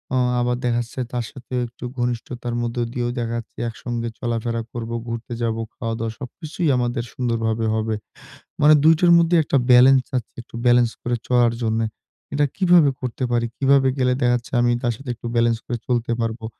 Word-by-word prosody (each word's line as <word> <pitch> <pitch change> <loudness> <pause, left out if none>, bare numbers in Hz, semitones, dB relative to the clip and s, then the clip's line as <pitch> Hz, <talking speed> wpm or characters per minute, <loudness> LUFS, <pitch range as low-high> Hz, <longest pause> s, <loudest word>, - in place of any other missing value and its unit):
আ - - +3 0.2
আবার 125 0 +1
দেখা 120 -1 +1
যাচ্ছে 120 +2 -7
তার 120 -1 -1
সাথে 130 -2 -12
একটু 120 - -14
ঘনিষ্ঠতার 120 0 -3
মধ্যে 120 +1 -2
দিয়েও 120 -2 -1
দেখা 115 0 -2
যাচ্ছে 115 - -13
একসঙ্গে 115 0 -4
চলাফেরা 115 -1 -2
করবো 115 0 -4
ঘুরতে 115 +1 -5
যাবো, 115 -1 -1
খাওয়া-দাওয়া 115 -1 -3
সবকিছুই 155 +5 -4
আমাদের 120 -1 -1
সুন্দরভাবে 115 -2 -1
হবে। 110 0 -1 0.7
মানে 150 +1 +7
২ 160 +1 +7
টোর 175 -1 +5
মধ্যে 170 +1 +3
একটা 140 - +1
balence 130 +1 +6
আছে 120 - -6
একটু 120 - -15
balence 120 -1 +4
করে 120 -1 0
চলার 120 -2 +4
জন্যে। 110 0 0 0.5
এটা 145 +1 +3
কিভাবে 175 -6 +5
করতে 130 0 -4
পারি 120 -1 +1
কিভাবে 135 -1 +4
গেলে 125 -1 +3
দেখা 120 -1 +3
যাচ্ছে 120 -1 -6
আমি 120 0 +3
তার 120 -1 +1
সাথে 135 0 -9
একটু 120 - -8
balence 115 -1 +2
করে 120 - -3
চলতে 120 -1 0
পারবো। 115 0 -3
120 Hz, 180 wpm, -22 LUFS, 115-125 Hz, 0.7 s, মানে